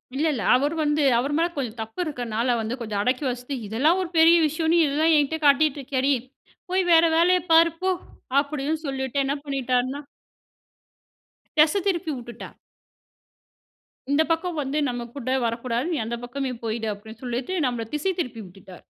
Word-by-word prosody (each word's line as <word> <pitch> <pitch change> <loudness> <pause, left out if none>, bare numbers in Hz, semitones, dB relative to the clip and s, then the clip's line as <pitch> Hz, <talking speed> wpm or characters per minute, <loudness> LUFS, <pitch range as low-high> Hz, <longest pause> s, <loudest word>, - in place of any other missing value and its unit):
இல்ல, 300 - 0
இல்ல. 225 -7 -3
அவரு 285 +5 +1
வந்து 295 0 +1 0.2
அவரு 280 +4 -2
மேல் 340 +1 0
கொஞ்சம் 245 -5 -4
தப்பு 225 +10 -8
இருக்கறதுனால 245 -4 -1
வந்து 225 +2 -3
கொஞ்சம் 210 -3 -3
அடக்கி 255 +5 0
வாசித்து, 250 +2 -4
"இதெல்லாம் 295 - +2
ஒரு 350 - -4
பெரிய 330 +1 +7
விஷயம்ன்னு 320 +2 +2
இதெல்லாம் 310 +3 +2
என்கிட்ட 300 +2 +1
காட்டிட்டு 290 0 +4
இருக்கியாடி. 270 +1 0 0.6
போய் 375 0 +2
வேற 330 0 +7
வேலைய 360 +2 +4
பாரு, 330 0 +6
போ!" 375 - +1 0.5
அப்படின்னு 295 +1 -3
சொல்லிட்டு 265 0 -2
என்ன 270 - 0
பண்ணிட்டாருனா 260 -1 -1 1.6
தெச 305 0 +5
திருப்பி 345 -4 0
விட்டுட்டார். 240 -1 -9 1.6
இந்த 300 +3 +4
பக்கம் 330 -1 -1
வந்து 275 +1 -3
நம்ம 245 -1 -4
கூட 255 -2 -4
வரக்கூடாது, 235 +3 -2
நீ - - -1
அந்த 235 +2 -3
பக்கமே 265 +1 -4
போயிடு 225 0 -2
அப்படின்னு 220 +3 -13
சொல்லிட்டு, 245 +7 -3
நம்மள 240 -2 -1
திசை 380 +6 0
திருப்பி 250 -8 -3
விட்டுட்டார். 180 0 -14
275 Hz, 155 wpm, -24 LUFS, 240-315 Hz, 1.6 s, பெரிய